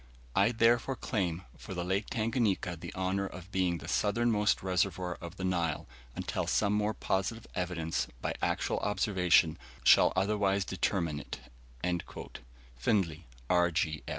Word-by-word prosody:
"I 100 +3 +5
therefore 120 +3 +3
claim 90 -8 -2
for 95 - -8
Lake 95 +4 -1
Tanganika 110 -6 0
the 85 - -8
honour 95 +1 0
of 90 +1 -10
being 90 -3 +1
the 75 - -9
SOUTHERNMOST 105 -1 +2
RESERVOIR 90 -1 0
OF 85 - -7
THE 95 - -5
NILE, 85 -4 0 0.3
until - - -2
some 105 -1 +2
more 105 +1 +1
positive 95 +4 -1
evidence, 85 -6 -1
by - - -2
actual - - 0
observation, 90 -5 +3 0.2
shall - - +7
otherwise 100 0 +2
determine 85 -5 -1
it." - - -7 1.4
Findlay, 85 - 0 0.2
R. 90 +1 +3
95 Hz, 125 wpm, -31 LUFS, 85-105 Hz, 1.4 s, shall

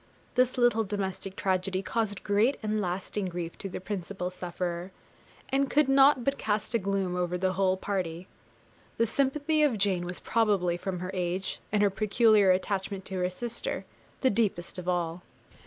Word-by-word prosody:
This 255 0 +2
little 240 -2 +4
domestic 195 -1 -4
tragedy 190 0 0
caused 210 -2 -2
great 215 +7 +2
and 215 0 0
lasting 190 +2 -2
grief 175 -1 -5
to 195 - -4
the - - -5
principal 185 -1 -4
sufferer, 175 0 -4 0.6
and 275 0 +1
could 300 -1 +3
not 270 -1 +6
but 275 +3 0
cast 210 +2 -1
a 230 - +3
gloom 195 -2 -1
over 180 0 -1
the 185 +1 0
whole 190 0 +2
party. 185 -3 -3 0.7
The 230 - +3
sympathy 290 +6 +1
of 285 -7 +3
Jane 190 -3 +1
was 180 0 -5
probably, 205 -6 +2
from 180 0 -4
her 185 +1 -4
age, 180 +1 -2
and 210 0 +3
her 200 - +4
peculiar 215 0 +4
attachment 190 +1 0
to 190 -1 -3
her 180 0 +1
sister, 240 - -4 0.4
the 260 - +4
deepest 195 -5 0
of 180 0 -4
all. 175 -1 -1
195 Hz, 170 wpm, -29 LUFS, 180-225 Hz, 0.7 s, not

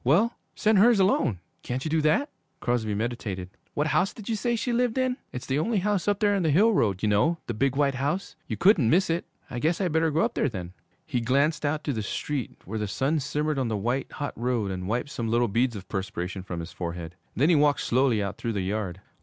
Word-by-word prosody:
'Well, 195 - +3 0.2
send 215 -2 +3
hers 230 +1 +6
alone. 135 - +2 0.2
Can't 130 +3 -4
you 155 - -2
do 160 0 +3
that?' 160 - +2 0.3
Crosby 110 -4 0
meditated. 100 -5 -3 0.2
'What 145 - +1
house 180 +4 +1
did 215 - -10
you 230 - 0
say 235 +3 0
she 235 +2 -1
lived 245 0 +1
in?' 255 -1 +1
'It's 125 - -6
the 135 +2 0
only 220 +7 +1
house 200 -1 0
up 205 -1 +2
there 205 -1 +3
on 200 - +1
the 160 - +2
hill 205 +10 +5
road. 100 - +1
You 105 - +3
know! 150 +12 +3
The 120 - -3
big, 135 +5 +1
white 140 -1 +2
house. 145 +10 -2
You - - -3
couldn't 175 - +5
miss 175 +3 +3
it.' 170 +2 -2 0.2
'I 120 - -3
guess 165 +6 +1
I 190 -3 +1
better 160 0 +2
go 155 +2 +1
up - - +1
there 145 - +1
then.' 90 -5 -6 0.3
He 125 -6 -1
glanced 140 +6 +2
out 150 +1 -1
to 145 - -1
the 110 - -2
street, 130 +5 -3
where 110 +4 -4
the 105 - -1
sun 140 +9 0
simmered 150 +1 -1
on 130 - 0
the 110 -2 -1
white, 120 +6 -1
hot 145 -1 -4
road, 120 -4 -1
and 90 -1 -4
wiped 120 +6 -1
some 115 - -3
little 120 +1 +3
beads 115 +3 +1
of 95 -2 -8
perspiration 95 -1 -4
from 90 -2 -5
his 85 - -8
forehead. 85 -1 -5 0.2
Then 145 +6 +3
he 175 - +5
walked 145 -2 +3
slowly 125 -4 +2
out 100 0 -5
through 115 - -2
the 100 - -1
yard. 95 -2 -3
135 Hz, 245 wpm, -27 LUFS, 110-170 Hz, 0.3 s, hers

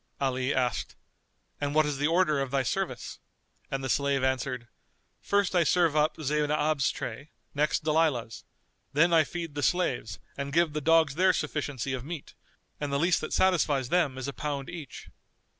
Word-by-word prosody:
Ali 130 -1 0
asked, 125 -2 -1 0.6
"And 145 0 -2
what 155 0 +5
is 145 -2 -2
the 145 - +2
order 165 -3 +2
of 135 -1 -2
thy 135 0 +1
service?" 115 - -3 0.5
and 135 0 -3
the - - -2
slave 140 0 +1
answered, 130 -2 -1 0.5
"First 200 -2 +1
I 175 - +5
serve 165 -1 +2
up 150 +1 +2
Zaynab's 150 -1 +1
tray, 130 +6 -6 0.2
next 150 +2 +1
Dalilah's; 150 -7 0 0.5
then 165 +4 +4
I 160 -1 +6
feed 165 0 -6
the 145 - -3
slaves 135 - 0 0.2
and 140 0 -4
give 165 -1 +3
the 150 - -2
dogs 160 -1 +4
their 185 +4 +4
sufficiency 145 -5 -3
of 130 -2 -4
meat, 155 0 -7 0.5
and 145 -1 -3
the 140 - +1
least 170 +4 +2
that 155 - -5
satisfies 150 -8 +2
them 160 -7 +1
is 130 - -4
a 140 - -4
pound 145 +1 -4
each." 155 -8 -9
145 Hz, 175 wpm, -28 LUFS, 135-160 Hz, 0.6 s, I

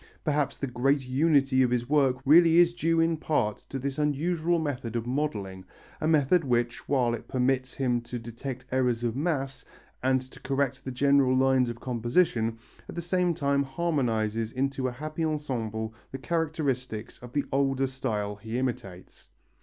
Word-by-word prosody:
Perhaps 145 -3 0
the - - -2
great 135 +2 0
unity 135 -1 +3
of 125 - +3
his 120 0 0
work 135 -3 +3
really 165 +3 +6
is 175 0 +6
due 165 -1 +1
in 165 0 +2
part 110 -10 0
to 135 - -7
this 135 +2 -3
unusual 160 +3 +1
method 130 -7 -3
of 115 -1 -1
modelling, 105 -9 -3 0.4
a 155 - +1
method 160 +2 +3
which, 120 -2 -1
while 125 -4 +2
it 115 - -6
permits 130 0 0
him 125 -3 0
to 120 +1 -6
detect 120 +3 -7
errors 125 -2 +1
of 115 -1 -1
mass, 135 -3 -2 0.4
and 130 0 +3
to 130 0 -13
correct 135 -1 -1
the - - -5
general 135 0 +3
lines 130 -1 +3
of 120 0 -6
composition, 120 -1 +1 0.3
at - - -7
the - - -3
same 175 0 +1
time 140 -1 +1
harmonizes 120 -7 -1
into 135 0 -1
a - - -2
happy 155 +6 -5
ensemble 115 -8 -2 0.2
the 135 - -4
characteristics 135 -6 -2
of 120 0 -11
the 145 - 0
older 135 0 +1
style 110 -6 -3
he 110 +3 -5
imitates. 100 -8 -5
130 Hz, 170 wpm, -28 LUFS, 120-150 Hz, 0.4 s, really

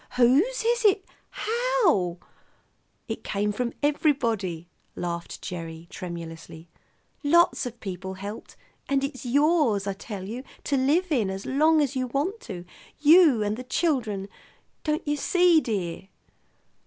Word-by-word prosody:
Whose 295 - +4
is 475 0 +2
it? 405 -2 +4 0.2
How 435 - +1 0.4
" - - -43
"It - - -5
came 210 0 -1
from 235 +3 -2
everybody," 230 - 0 0.3
laughed 170 -1 -5
Gerry 165 -2 -6
tremulously. 165 -2 -8 0.5
"Lots 335 -2 +4
of 240 -1 -9
people 190 -2 -6
helped. 200 +3 -8 0.3
And 275 -1 +2
it's 270 -2 -4
yours, 285 - +3
I 200 - -1
tell 195 -1 -7
you, 235 +5 -5 0.2
to 285 - 0
live 305 +7 +2
in 230 -9 +2
as 190 +1 -5
long 310 +3 +3
as 285 -2 -1
you 255 -1 -1
want 295 - -1
to, 175 -1 -6 0.3
you 300 -6 +6
and 210 +1 -1
the 255 - -6
children. 245 - -1 0.6
Don't 305 +1 -1
you 295 0 +1
see, 350 +1 +4
dear?" 190 - -3
250 Hz, 140 wpm, -26 LUFS, 195-310 Hz, 0.6 s, you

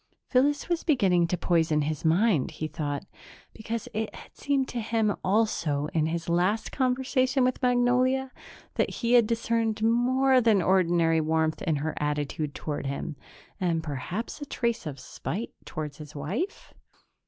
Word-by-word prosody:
Phyllis 285 +3 +2
was 345 -1 -1
beginning 190 - +3
to 180 - -1
poison 160 -3 +2
his 155 0 -3
mind, 170 - +3
he 155 - -4
thought, 150 0 -4 0.5
because 225 0 -5
it 220 0 -3
had - - -13
seemed 275 -2 0
to 240 - -3
him 220 -2 +1
also, 170 -8 +1
in 155 -1 +2
his 165 +1 -3
last 180 +6 +1
conversation 260 0 +1
with 255 0 0
Magnolia, 250 +1 +2 0.5
that - - +2
he 235 0 -1
had 235 -3 +6
discerned 230 -1 0
more 255 +3 +4
than 220 -4 +4
ordinary 170 -3 +3
warmth 160 0 0
in 160 -3 0
her 150 +2 -2
attitude 150 0 -2
toward 145 -2 -4
him... 140 +2 -4 0.4
and 170 -3 0
perhaps 160 - -4
a - - -4
trace 235 -9 -1
of 140 -3 -6
spite 205 - -5
toward 150 -2 -5
his 150 -1 -11
wife? 195 - -4
195 Hz, 155 wpm, -27 LUFS, 155-245 Hz, 0.5 s, had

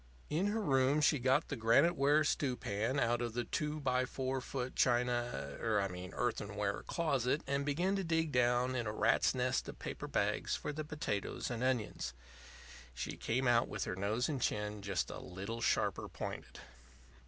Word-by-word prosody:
In 170 +6 +2
her 215 +1 0
room 135 -1 +3
she 150 -1 +4
got 130 +5 +2
the - - -2
granite 125 +10 +4
ware 145 +2 +4
stew 140 -3 +1
pan 110 +4 -1
out 120 -1 +2
of 120 -2 -2
the 120 +1 -1
2x4 130 -2 -1
foot 130 0 -4
china 120 -1 +1
er 110 -2 +2
I 100 0 0
mean 90 +1 -7
earthenware 105 -4 -1
closet, 140 -4 +1
and 140 +1 0
began 175 +7 +1
to 195 - -1
dig 165 -2 +1
down 125 0 +2
in 120 -3 -1
a - - -1
rat's 110 - +3
nest - - 0
of - - -8
paper - - -5
bags - - 0
for - - -4
the 155 +1 -3
potatoes 145 -9 -3
and 120 +1 -2
onions. 110 - -1 0.8
She - - -4
came 125 +3 0
out 120 -1 +4
with 105 - -3
her - - -3
nose 105 +6 0
and 140 -5 -2
chin 105 -1 -1
just 100 -4 -1
a - - -6
little 100 +6 -6
sharper - - +1
pointed. - - -6
125 Hz, 175 wpm, -35 LUFS, 110-145 Hz, 0.8 s, she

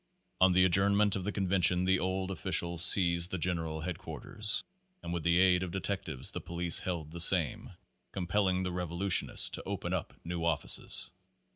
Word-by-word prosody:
On 95 -1 +4
the 90 +1 +3
ad 90 - -1
journment 100 +1 +3
of 95 - -5
the 105 - -3
convention 90 -2 0
the 95 0 +1
old 95 +1 -4
officials 85 0 0
seized 85 -2 +5
the 95 - -5
general 80 -2 -3
headquarters, 105 +6 -3 0.4
and 85 - -6
with 85 - -4
the 85 +1 +1
aid 90 -1 +2
of 95 - -5
detectives 85 -7 -3
and - - -6
police 85 0 +1
held 85 -4 -6
the 85 +1 -1
same, 85 -4 +3 0.4
compelling 95 0 -2
the 90 - -4
revolutionists 90 +1 +2
to - - -6
open - - -6
up - - -5
new 85 0 -5
offices. 85 -3 +1
90 Hz, 170 wpm, -29 LUFS, 85-95 Hz, 0.4 s, seized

